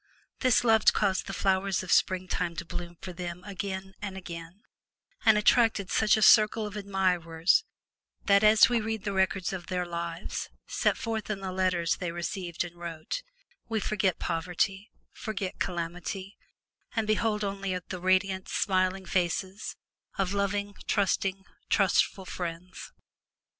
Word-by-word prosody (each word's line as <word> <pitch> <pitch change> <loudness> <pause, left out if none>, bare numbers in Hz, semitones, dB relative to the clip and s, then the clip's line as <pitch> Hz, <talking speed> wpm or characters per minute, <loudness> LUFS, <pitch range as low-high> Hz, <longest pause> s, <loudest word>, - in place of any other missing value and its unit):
This 255 -3 +4
love 220 -2 +4
caused 195 -2 +1
the - - -4
flowers 195 0 +1
of 185 - -5
springtime 180 -2 +1
to 165 - -5
bloom 175 0 -6
for 185 - -6
them 175 0 -6
again 190 -1 -5
and 195 -2 -5
again, 170 +2 -9 0.6
and 220 -1 +7
attracted 215 -2 +3
such 220 0 +4
a 215 - +2
circle 215 0 +6
of 210 0 -7
admirers 185 - +1 0.6
that, 200 0 +5
as 215 +1 +7
we 235 -1 +1
read 220 -1 -3
the 200 - -2
records 190 -1 +1
of 180 -3 -6
their 180 -1 -1
lives, 170 -1 -4 0.2
set - - +1
forth 225 -4 -3
in 210 -2 -2
the 190 -1 -4
letters 185 -3 +1
they 180 -3 -3
received 175 0 -3
and 175 0 -9
wrote, 170 - -5 0.5
we 225 -1 0
forget 195 -3 0
poverty, 180 +4 -1 0.2
forget 195 -3 -4
calamity, 180 +3 -4 0.6
and 225 -1 +1
behold 215 0 +1
only 195 -2 -2
the 185 -2 -5
radiant, 185 +1 +1
smiling 185 0 +1
faces 185 +2 -1 0.4
of 195 0 0
loving, 200 0 -1
trusting, 195 -1 0 0.2
trustful 195 -1 +2
friends. 175 0 -6
190 Hz, 140 wpm, -29 LUFS, 180-205 Hz, 0.6 s, and